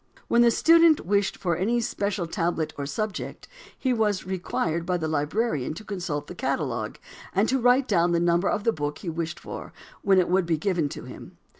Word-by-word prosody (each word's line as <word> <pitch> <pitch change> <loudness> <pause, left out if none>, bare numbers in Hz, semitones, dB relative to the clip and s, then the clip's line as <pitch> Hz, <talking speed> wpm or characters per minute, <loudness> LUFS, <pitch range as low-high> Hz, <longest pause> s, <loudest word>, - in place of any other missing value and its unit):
When 235 - +4
the 240 - +6
student 330 +4 +5
wished 200 +1 +1
for 175 -3 0
any 215 +8 +1
special 200 -5 -2
tablet 165 -3 -1
or 140 -1 -4
subject, 215 +5 -4 0.3
he 260 -2 0
was 210 -4 0
required 170 -3 -2
by 180 +1 0
the 160 -2 -2
librarian 155 - -1
to 215 - -8
consult 175 -8 -4
the - - -8
catalogue 130 -8 -2 0.4
and 200 +4 +3
to 265 +1 +2
write 250 +2 +4
down 175 -4 +3
the 170 - +2
number 175 +2 +2
of 205 - -1
the 230 - +2
book 145 -1 -3
he 180 - -6
wished 165 0 -4
for, - - -8 0.3
when 195 -1 +4
it 180 - +4
would 185 -1 +2
be 165 -2 +1
given 170 -4 0
to - - -8
him. - - -11
180 Hz, 200 wpm, -26 LUFS, 160-215 Hz, 0.4 s, the